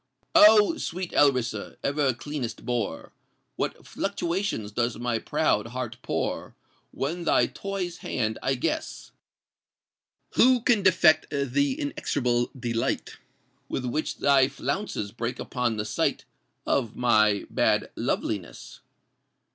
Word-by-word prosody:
Oh! 215 Hz, +8 st, +7 dB
sweet 180 Hz, +1 st, -4 dB
Alrissa—ever 130 Hz, +1 st, +1 dB
cleanest 135 Hz, -2 st, -5 dB
bore! 120 Hz, -4 st, -3 dB, 0.4 s
What -, -, -3 dB
fluctuations 180 Hz, -, -2 dB
does 120 Hz, +2 st, -1 dB
my 120 Hz, -1 st, -1 dB
proud 115 Hz, -8 st, 0 dB
heart 120 Hz, -1 st, -5 dB
pour -, -, -3 dB, 0.3 s
When 165 Hz, +6 st, -3 dB
thy -, -, +3 dB
toy's 195 Hz, -3 st, -4 dB
hand 110 Hz, -3 st, -2 dB
I 135 Hz, -, +1 dB
guess! 315 Hz, -, -3 dB, 1.2 s
Who 255 Hz, -1 st, +5 dB
can 230 Hz, -3 st, +3 dB
defect 175 Hz, -4 st, +4 dB
th' 140 Hz, -3 st, -3 dB
inexorable 130 Hz, -3 st, 0 dB
delight 115 Hz, -2 st, -2 dB, 0.5 s
With 130 Hz, -, -3 dB
which 140 Hz, +6 st, -2 dB
thy 135 Hz, -2 st, +4 dB
flounces 140 Hz, -, -3 dB
break 120 Hz, +2 st, -4 dB
upon 125 Hz, -3 st, -2 dB
the 105 Hz, -, -2 dB
sight -, -, -1 dB, 0.4 s
Of 120 Hz, -5 st, 0 dB
my 110 Hz, -4 st, +3 dB
bad -, -, +1 dB
loveliness? -, -, -3 dB
135 Hz, 110 wpm, -26 LUFS, 120-170 Hz, 1.2 s, Oh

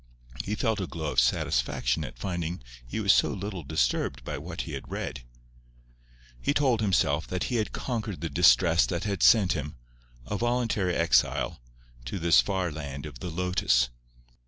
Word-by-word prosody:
He 105 Hz, -, -2 dB
felt 110 Hz, -2 st, 0 dB
a 95 Hz, -, -3 dB
glow 80 Hz, -3 st, -4 dB
of -, -, +2 dB
satisfaction -, -, +1 dB
at -, -, -8 dB
finding 85 Hz, +1 st, -4 dB, 0.2 s
he -, -, -4 dB
was 100 Hz, -2 st, +5 dB
so -, -, +3 dB
little 100 Hz, -2 st, -5 dB
disturbed 70 Hz, -5 st, -1 dB
by -, -, -4 dB
what -, -, -5 dB
he -, -, -7 dB
had -, -, -7 dB
read. 65 Hz, -, -4 dB, 1.2 s
He 145 Hz, -, 0 dB
told 130 Hz, -6 st, +2 dB
himself 85 Hz, -7 st, +1 dB
that 90 Hz, 0 st, -2 dB
he -, -, +2 dB
had 110 Hz, -, -1 dB
conquered 110 Hz, -6 st, -4 dB
the 85 Hz, -, -1 dB
distress 85 Hz, +1 st, +5 dB
that 85 Hz, -2 st, -2 dB
had 100 Hz, -2 st, -2 dB
sent 105 Hz, -6 st, +6 dB
him, 75 Hz, -1 st, -5 dB, 0.5 s
a 85 Hz, -, -3 dB
voluntary 115 Hz, -6 st, 0 dB
exile, 65 Hz, -6 st, +2 dB, 0.4 s
to 60 Hz, -, -4 dB
this 85 Hz, -1 st, +5 dB
far 95 Hz, -3 st, -1 dB
land 70 Hz, -2 st, -6 dB
of 75 Hz, -5 st, -9 dB
the 90 Hz, -, -5 dB
lotus. 85 Hz, -8 st, +1 dB
90 Hz, 170 wpm, -27 LUFS, 75-100 Hz, 1.2 s, sent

